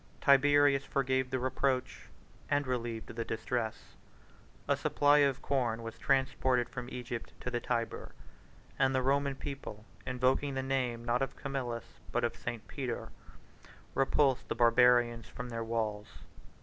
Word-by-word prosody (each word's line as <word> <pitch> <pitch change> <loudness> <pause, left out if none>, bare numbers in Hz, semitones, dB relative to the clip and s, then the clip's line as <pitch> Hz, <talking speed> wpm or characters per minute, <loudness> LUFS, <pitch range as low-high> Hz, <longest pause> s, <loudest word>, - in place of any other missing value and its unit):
Tiberius 140 0 +5
forgave 130 -2 0
the 130 - -1
reproach, 130 0 -1 0.4
and 145 0 +2
relieved 120 -3 -3
the 115 - -2
distress: 110 0 -3 0.7
a - - +3
supply 145 +1 +3
of 140 -2 +2
corn 120 -4 0
was 115 0 -7
transported 130 -2 +2
from 125 -2 -6
Egypt 120 -2 -6
to 125 - -3
the 120 - 0
Tyber; 115 -2 -3 0.7
and 135 -1 +3
the 130 - +2
Roman 140 +1 +1
people, 135 -7 -7 0.2
invoking 130 +2 +1
the 130 - -1
name, 125 -3 -1
not 120 +2 +1
of 135 0 -2
Camillus, 120 -4 -5
but 120 - 0
of 120 - 0
St. 120 -2 -6
Peter 130 -4 -4 0.8
repulsed 135 -1 +2
the - - -2
Barbarians 120 0 +4
from 125 0 -7
their 115 -1 -3
walls. 110 -2 -2
125 Hz, 140 wpm, -32 LUFS, 120-135 Hz, 0.8 s, Tiberius